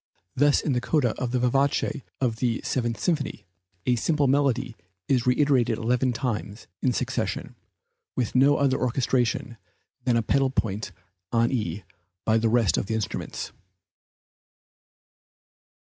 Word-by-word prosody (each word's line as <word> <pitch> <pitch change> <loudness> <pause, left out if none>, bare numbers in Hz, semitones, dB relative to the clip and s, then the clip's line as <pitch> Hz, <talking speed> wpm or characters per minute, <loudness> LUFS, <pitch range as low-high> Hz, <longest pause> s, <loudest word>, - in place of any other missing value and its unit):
Thus 145 +1 +4
in 145 - 0
the 125 - 0
coda 140 -2 +2
of 125 - 0
the 125 - 0
vivace 135 +3 +1 0.2
of 120 -4 0
the 120 -1 0
Seventh 120 -4 -1
Symphony, 155 -2 -1 0.4
a 125 - +3
simple 145 +5 +1
melody 135 -3 +1 0.3
is 125 -3 +1
reiterated 125 -3 +3
eleven 125 +3 +1
times 115 -3 -3 0.2
in 130 - +2
succession, - - -2 0.6
with 120 -4 -1
no 140 +3 +5
other 135 -1 +2
orchestration 120 -2 0 0.5
than 125 -2 +2
the 115 - +2
pedal 135 +4 +2
point 110 -4 -2 0.4
on 115 0 +2
E 105 -5 -2 0.4
by 110 0 +3
the 115 0 +2
rest 115 -4 +3
of - - -4
the 110 - -1
instruments. 110 -4 -4
125 Hz, 135 wpm, -26 LUFS, 115-135 Hz, 0.6 s, no